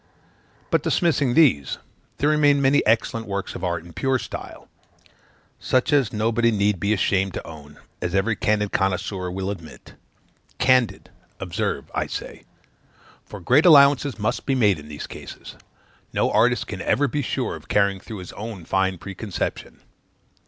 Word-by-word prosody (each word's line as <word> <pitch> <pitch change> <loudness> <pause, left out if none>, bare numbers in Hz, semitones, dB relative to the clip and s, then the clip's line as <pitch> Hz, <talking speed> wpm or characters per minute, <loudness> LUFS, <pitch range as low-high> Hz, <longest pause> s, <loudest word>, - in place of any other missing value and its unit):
But, - - +3
dismissing 145 -8 +1
these, 130 - +3 0.4
there 145 - +2
remain 145 -2 +4
many 140 +1 +3
excellent 115 0 +1
works 100 -1 -4
of 90 - -8
art 85 -2 -2
in 85 - -13
a - - -17
pure 135 -1 +1
style, - - -8 0.9
such 130 +3 +1
as 135 -6 +3
nobody 115 +2 +1
need 105 -3 +1
be 100 +4 0
ashamed 95 -2 +1
to - - -6
own, 75 -2 -12 0.2
as 90 +1 -2
every 105 +3 +1
candid 105 0 0
connoisseur 95 -1 -1
will 95 +2 -3
admit. 85 -6 -11 0.6
Candid, 130 -3 +2 0.3
observe, - - -3
I - - -1
say; - - -7 0.8
for 105 - -10
great 130 - +4
allowances 140 -4 +6
must 105 0 -2
be 135 - +2
made 105 -9 +3
in 75 - -12
these 75 -1 -7
cases; - - -10 0.6
no - - +1
artist - - +2
can - - -6
ever 140 +6 +2
be 145 +1 -2
sure 130 - -2
of - - -13
carrying 100 -1 +2
through 110 +3 -9
his - - -11
own 105 -5 -7
fine 95 0 0
preconception. 100 +2 -5
105 Hz, 160 wpm, -23 LUFS, 95-130 Hz, 0.9 s, allowances